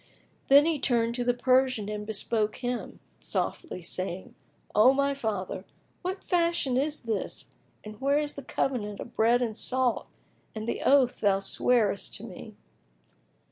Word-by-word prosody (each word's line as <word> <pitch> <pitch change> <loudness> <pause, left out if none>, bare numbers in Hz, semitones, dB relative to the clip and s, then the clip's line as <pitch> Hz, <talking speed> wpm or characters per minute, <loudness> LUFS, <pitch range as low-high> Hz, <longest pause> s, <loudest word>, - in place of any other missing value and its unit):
Then 285 +2 +7
he 325 -3 +1
turned 235 -3 +1
to 245 0 -2
the 245 0 +1
Persian 255 -4 +2
and 210 0 -5
bespoke 215 0 -1
him 245 -1 -4 0.2
softly, 250 - -3
saying, 185 +1 -4 0.4
"O 220 +6 +6
my 280 0 +2
father, 210 -8 -3 0.4
what 375 +2 -4
fashion 335 -7 +1
is 295 +3 0
this 225 -4 -3 0.3
and 215 +2 -10
where 280 +2 +3
is 295 -1 -1
the 280 - -7
covenant 220 -6 -2
of - - -9
bread 235 +3 +3
and 225 -3 -3
salt 255 +1 0 0.5
and 220 +1 -5
the - - -2
oath 265 -3 +4
thou 200 -2 +4
swarest 205 +1 +1
to 215 - -10
me?" 215 0 -10
245 Hz, 150 wpm, -28 LUFS, 210-270 Hz, 0.5 s, Then